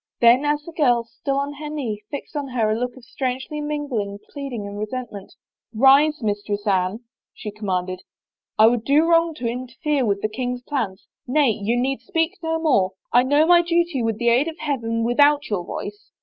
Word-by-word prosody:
Then 240 +4 +5
as 295 0 0
the 335 - -9
girl, 250 -8 +2
still 275 +4 -4
on 280 +1 -2
her 300 +1 -7
knee, 245 -9 -4
fixed 285 - -7
on 285 -2 -2
her 230 -4 0
a - - +1
look 245 +2 -3
of 250 - -14
strangely 260 +5 -3
mingled 275 -10 -3
pleading 275 -7 -5
and 200 0 -7
resentment, 215 -2 -6 0.3
" 230 - -49
Rise, 275 +4 +5
Mistress 205 0 -2
Anne," 190 +2 0 0.3
she 210 - -6
commanded. 185 -3 -3 0.3
" - - -69
I 215 - +7
would 230 0 +3
do 290 +5 +4
wrong 335 -1 +3
to 245 -6 -3
interfere 255 +4 -2
with 200 -3 0
the - - +2
king's 245 +2 -4
plans. 225 -9 -3 0.2
Nay, 275 -1 +3
you 220 +3 -1
need 265 +2 -1
speak 325 -4 -1
no 325 -1 -1
more. 255 - +2 0.2
I 245 - +7
know 290 +4 +3
my 345 +1 +6
duty 340 -4 0
with 225 -2 -1
the 235 +1 +2
aid 250 +6 +3
of 325 0 -5
Heaven 230 -7 -2
with 240 +4 -1
out 290 -3 +4
your 190 -4 -1
voice. 205 +4 -7
250 Hz, 205 wpm, -22 LUFS, 215-295 Hz, 0.3 s, I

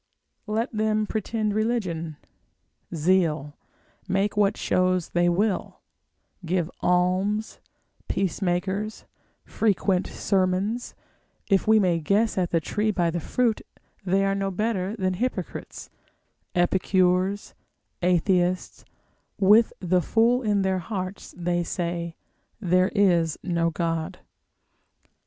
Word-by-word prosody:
Let 220 +4 -1
them 215 0 +1
pretend 215 0 -2
religion, 185 -9 -1 0.8
zeal, 155 -3 +1 0.5
make 195 +2 0
what 205 0 +2
shows 185 -1 +1
they 175 0 +2
will, 195 +3 -1 0.6
give 175 0 -1
alms, 185 +4 +1 0.5
peace 190 0 -1
makers, 190 +4 -2 0.4
frequent 195 -3 +1
sermons, 195 +5 -1 0.6
if 195 +1 +3
we 220 0 +6
may 180 -4 +2
guess 205 +8 +1
at 180 -2 0
the 165 - +2
tree 210 +7 -1
by 175 -5 +1
the 175 - -2
fruit, 230 +6 0 0.4
they 195 +1 +2
are 195 - +1
no 195 0 -1
better 200 0 -1
than 185 -4 -1
hypocrites, 195 -3 -4 0.6
epicures, 185 +2 +1 0.5
atheists, 180 0 +1 0.5
with 210 +3 +5
the 180 0 +1
fool 230 - +2
in 205 -4 +1
their 190 -1 +1
hearts 185 0 -6
they 175 0 0
say 170 -1 -3 0.4
there 185 -2 +2
is 175 -6 +3
no 170 -1 +1
God. 165 -1 -2
185 Hz, 110 wpm, -25 LUFS, 175-210 Hz, 0.8 s, we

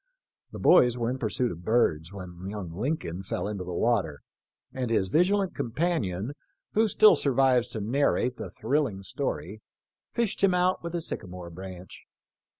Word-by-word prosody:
The - - -7
boys 125 -8 +5
were 120 0 0
in 130 - -4
pursuit 120 +1 0
of 85 +1 -9
birds, 85 -7 +1
when 90 -2 -8
young 100 -5 -6
Lincoln 105 - -3
fell 95 - -3
into 100 -3 -4
the 90 - -6
water, 90 -6 0 0.5
and 125 -2 -2
his 100 -5 +1
vigilant 190 - +2
companion, 115 - -1 0.4
who 220 +1 +4
still 210 -1 +6
survives 130 -3 +3
to 110 - -5
narrate 125 +1 +1
the - - -6
thrilling 135 -9 -1
story, 95 +2 -4 0.5
fished 225 -4 -1
him 190 -2 +5
out 180 +1 +2
with 170 0 -5
a 170 - -1
sycamore 90 - -6
branch. 95 +1 -10
115 Hz, 155 wpm, -27 LUFS, 95-150 Hz, 0.5 s, still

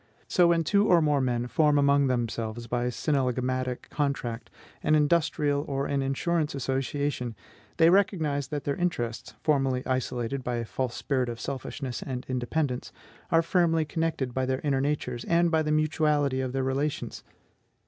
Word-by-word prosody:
So, 180 -2 +4
when 170 -1 +3
two 200 +5 +3
or 175 - +6
more 150 -3 +2
men 120 -2 0
form 150 +3 +3
among 140 0 +4
themselves, 120 -2 -2
by 120 +1 -1
synallagmatic 130 -2 -1
contract, 130 -5 -2 0.3
an 155 - +3
industrial 150 -2 +2
or 140 0 -1
an 140 -1 0
insurance 150 +3 0
association, 135 -2 -2 0.4
they 165 0 +6
recognize 160 -8 +2
that 145 0 -4
their 140 - -1
interests, 120 -11 -3
formerly 135 -4 +1
isolated 130 0 -2
by 125 0 -2
a 120 -1 -2
false 125 +1 -3
spirit 130 -4 -1
of 115 -1 -6
selfishness 135 -1 -5
and 125 -2 -5
independence, 130 +1 -2 0.4
are 165 -1 +4
firmly 165 -2 +2
connected 155 -5 -2
by 130 0 -1
their 130 0 -1
inner 140 -3 +1
natures, 130 -4 -2
and 170 0 +3
by 160 -1 +3
the 150 -1 -1
mutuality 150 -3 +2
of 130 -1 -2
their 135 0 -1
relations. 140 +3 -2
140 Hz, 160 wpm, -27 LUFS, 125-155 Hz, 0.4 s, or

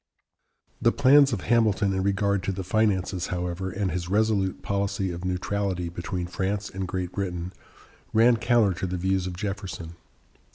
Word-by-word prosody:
The 115 - +4
plans 140 +1 +6
of 105 -6 -2
Hamilton 110 -4 +2
in 95 - 0
regard 100 0 +1
to - - 0
the 95 0 -4
finances, 95 -2 0
however, 90 +1 -3
and 95 0 -2
his 90 -1 -3
resolute 100 -2 +1
policy 100 -1 -1
of 85 +1 -6
neutrality 90 -1 -2
between 85 +1 -4
France 95 +3 -2
and 95 -1 -4
Great 90 -1 -3
Britain, 90 -2 -4 0.6
ran 115 +2 +5
counter 115 -3 +3
to 95 - -1
the 90 0 -3
views 95 +1 0
of 90 -1 -6
Jefferson. 95 -5 -5
95 Hz, 160 wpm, -26 LUFS, 90-105 Hz, 0.6 s, plans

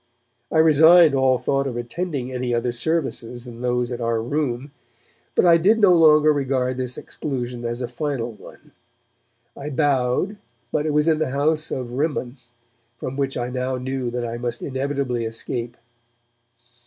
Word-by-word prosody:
I - - +1
resigned 160 +1 +7
all 130 -1 +3
thought 135 +2 0
of 120 -3 -4
attending 130 +1 -4
any 125 -1 -1
other 120 +1 0
services 125 -3 -2
than 120 -1 -10
those 125 0 0
at 120 - -4
our 115 -1 0
'Room', 135 +1 -2 0.6
but - - +4
I 170 -1 +7
did 200 +7 +4
no 200 -4 +6
longer 155 -2 +6
regard 130 -3 -1
this 125 -1 -3
exclusion 125 -4 -5
as 120 +1 -3
a 125 - -2
final 125 -2 -3
one. 110 - -15 0.8
I 140 +2 -6
bowed, 145 +6 0 0.3
but 150 +1 0
it - - +1
was 150 +1 +3
in 160 -1 +3
the 155 - 0
house 150 +3 +1
of 125 -2 -4
Rimmon, 135 -1 -2 0.6
from 130 - -5
which 135 -1 -2
I 120 0 -3
now 130 +1 -2
knew 130 0 -3
that 120 0 -3
I 120 0 -5
must 120 -1 -4
inevitably 135 -3 -2
escape. 115 +1 -5
130 Hz, 165 wpm, -22 LUFS, 120-150 Hz, 0.8 s, resigned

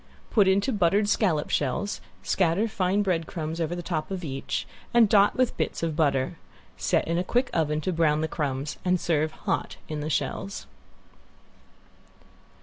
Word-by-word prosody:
Put 205 -4 +4
into 200 +7 +2
buttered 205 +1 +3
scallop 175 -8 +1
shells, 150 +9 -1 0.2
scatter 185 +4 +2
fine 200 -1 +1
bread 170 -4 0
crumbs 165 -2 -4
over 165 +2 -1
the 175 - -5
top 165 -3 -2
of 190 -2 -4
each, 135 -3 -3 0.3
and 235 -2 +7
dot 205 0 +5
with 255 -1 +1
bits - - -2
of 160 -2 -1
butter. 140 -4 +1 0.4
Set - - +1
in 170 +1 +1
a - - 0
quick 245 +7 0
oven 155 -2 +1
to 185 +4 -1
brown 155 -2 +2
the 160 - 0
crumbs, 145 -2 -3
and 180 0 +2
serve 155 -2 +1
hot - - -3
in 155 -1 -4
the 150 +1 -3
shells. 195 +5 -2
170 Hz, 165 wpm, -26 LUFS, 155-195 Hz, 0.4 s, and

